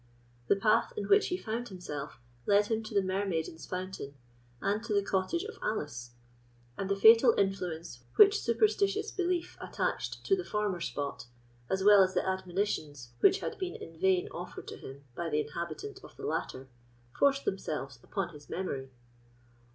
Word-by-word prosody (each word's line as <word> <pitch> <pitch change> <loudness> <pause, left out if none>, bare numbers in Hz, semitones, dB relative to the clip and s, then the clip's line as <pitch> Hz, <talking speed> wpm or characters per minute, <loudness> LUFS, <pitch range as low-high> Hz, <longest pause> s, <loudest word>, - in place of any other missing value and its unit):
The - - +5
path 215 - +2
in - - -2
which 410 +1 +5
he 360 - -1
found 235 -3 -4
himself 145 - -6 0.3
led 205 +1 +5
him 225 +1 0
to 215 - -7
the 200 - +4
Mermaiden's 185 -5 -2
Fountain, 185 -6 -5 0.4
and 205 - 0
to 230 - -2
the 200 - +3
cottage 195 - 0
of 440 0 -8
Alice; 120 - -3 0.6
and 195 +5 -3
the 200 - +2
fatal 225 +4 +7
influence 175 -9 -2
which 415 0 +7
superstitious 410 - +2
belief 360 -2 -1
attached - - -3
to 390 - +4
the 370 - -3
former 210 - -1
spot, 140 -6 -4 0.4
as 190 0 0
well 205 0 +8
as 185 0 +2
the - - +1
admonitions 180 - -2
which - - +5
had - - -4
been 370 -2 -3
in 165 - -9
vain 190 -1 +3
offered 175 +1 -8
to - - -7
him 135 +1 -10
by 170 +5 -3
the 150 -1 +1
inhabitant 170 - -5
of - - -14
the - - -6
latter, 130 +1 -3 0.5
forced 280 0 +3
themselves 140 -9 -3
upon 195 +4 -3
his 145 -1 -13
memory. 140 -8 -3
190 Hz, 165 wpm, -31 LUFS, 160-230 Hz, 0.6 s, well